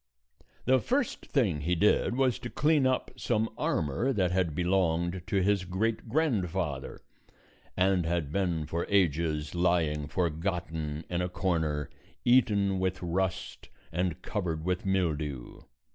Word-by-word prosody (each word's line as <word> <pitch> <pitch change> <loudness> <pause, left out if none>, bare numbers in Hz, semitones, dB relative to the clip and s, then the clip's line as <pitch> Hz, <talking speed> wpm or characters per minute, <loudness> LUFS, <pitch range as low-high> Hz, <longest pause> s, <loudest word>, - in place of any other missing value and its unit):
The 130 +1 +4
first 260 - -1
thing 100 - +1
he 90 +4 +1
did 105 +5 +3
was 130 -2 +2
to 120 - -6
clean 150 -1 +3
up 130 - 0
some 115 -3 0
armor 80 - 0
that 95 -7 +1
had 90 -4 0
belonged 90 0 +1
to 95 -2 +1
his 100 -1 +2
great 110 +6 -2
grandfather, 95 - -1 0.8
and 95 -1 +3
had 85 -4 -1
been 85 -4 0
for 85 +3 -3
ages 80 -6 +1
lying 85 -4 +1
forgotten 80 -2 -2
in 90 0 -1
a 90 - -1
corner, 80 -5 -1 0.4
eaten 105 -6 +3
with 95 0 -1
rust 95 +2 -2 0.2
and 90 -1 -1
covered 85 -6 -3
with 90 +1 -1
mildew. 75 -9 -1
90 Hz, 130 wpm, -29 LUFS, 80-100 Hz, 0.8 s, The